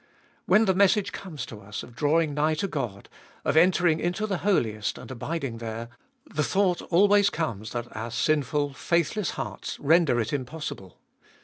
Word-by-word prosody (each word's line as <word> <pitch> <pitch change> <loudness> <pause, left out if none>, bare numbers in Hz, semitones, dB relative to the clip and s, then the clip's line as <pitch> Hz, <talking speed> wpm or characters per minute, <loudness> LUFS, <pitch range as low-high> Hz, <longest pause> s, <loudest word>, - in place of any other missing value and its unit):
When 220 +1 +5
the 190 - +3
message 200 +1 +3
comes 165 -11 -6
to 105 -2 -10
us 105 +2 -6
of 120 - -13
drawing 155 +2 +2
nigh 155 +2 +1
to 175 +6 -1
God, 120 - -4 0.4
of - - +1
entering 170 -1 +4
into 175 +6 -1
the 195 -4 -2
Holiest 110 - 0
and - - -10
abiding 135 -2 -4
there, 115 0 -5 0.4
the 155 - -2
thought 190 -1 +1
always 205 +3 +5
comes 110 - -3
that 120 0 -5
our 110 +2 -4
sinful, 145 +3 0
faithless 170 +7 0
hearts - - -5
render 155 -4 +4
it 115 +4 -2
impossible. 130 - -5
155 Hz, 165 wpm, -26 LUFS, 120-180 Hz, 0.4 s, When